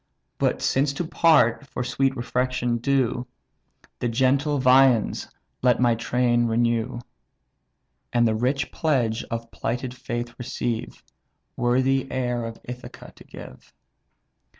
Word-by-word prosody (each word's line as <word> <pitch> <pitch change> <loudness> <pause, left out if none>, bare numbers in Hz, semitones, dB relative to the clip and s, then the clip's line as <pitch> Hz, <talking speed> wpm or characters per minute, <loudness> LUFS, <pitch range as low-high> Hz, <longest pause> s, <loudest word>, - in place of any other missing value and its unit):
But, - - 0
since 140 +1 +1
to 170 +5 -3
part, 150 -6 +3
for 125 - -4
sweet 135 +2 0
refection 125 0 -1
due, 125 -1 0 0.7
The 120 - -1
genial 135 +5 +2
viands 130 -3 +4 0.3
let 125 -1 +3
my 120 -1 +4
train 120 +1 +1
renew; 120 +1 0 1.1
And 120 -1 +3
the 110 - +1
rich 125 +6 -1
pledge 120 -8 0
of 115 0 -6
plighted 125 +2 -3
faith 120 -1 -5
receive, 120 -1 -4 0.5
Worthy 130 +2 +2
the 135 - -13
heir 125 -2 -1
of 115 0 -7
Ithaca 125 0 -10
to - - -14
give." - - -13
125 Hz, 125 wpm, -24 LUFS, 120-130 Hz, 1.1 s, viands